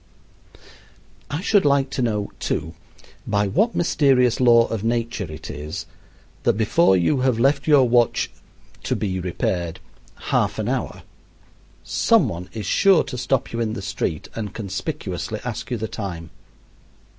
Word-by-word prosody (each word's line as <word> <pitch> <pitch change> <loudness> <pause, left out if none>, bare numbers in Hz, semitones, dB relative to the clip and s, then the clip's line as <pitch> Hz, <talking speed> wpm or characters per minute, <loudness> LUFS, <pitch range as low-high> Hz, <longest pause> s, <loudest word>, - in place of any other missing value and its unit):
I 145 +4 -3
should 200 0 +3
like 140 -1 +2
to 135 - -2
know, 105 -4 -1
too, 80 +2 -2 0.5
by 105 0 +1
what 210 - +1
mysterious 135 -7 +3
law 120 -2 +6
of 110 -2 -4
nature 115 -6 -2
it 75 0 -7
is 75 +3 -6 0.6
that - - +3
before 110 - +3
you 90 - +2
have 130 -2 +2
left 140 +4 +2
your 140 -4 +6
watch 120 0 +2 0.5
"to - - -1
be 95 -3 -2
repaired" 85 -1 -2 0.5
half - - +1
an - - -2
hour, - - -3 0.8
some - - +3
one 90 +2 -6
is 110 -2 -6
sure 190 - +4
to - - -7
stop 130 0 -1
you 115 - -2
in 110 -2 -1
the 100 - -5
street 80 -4 -3
and 105 -4 -5
conspicuously 100 -5 -4
ask - - -5
you 120 - -1
the 110 +1 -3
time. 85 -7 -6
115 Hz, 150 wpm, -22 LUFS, 95-130 Hz, 0.8 s, law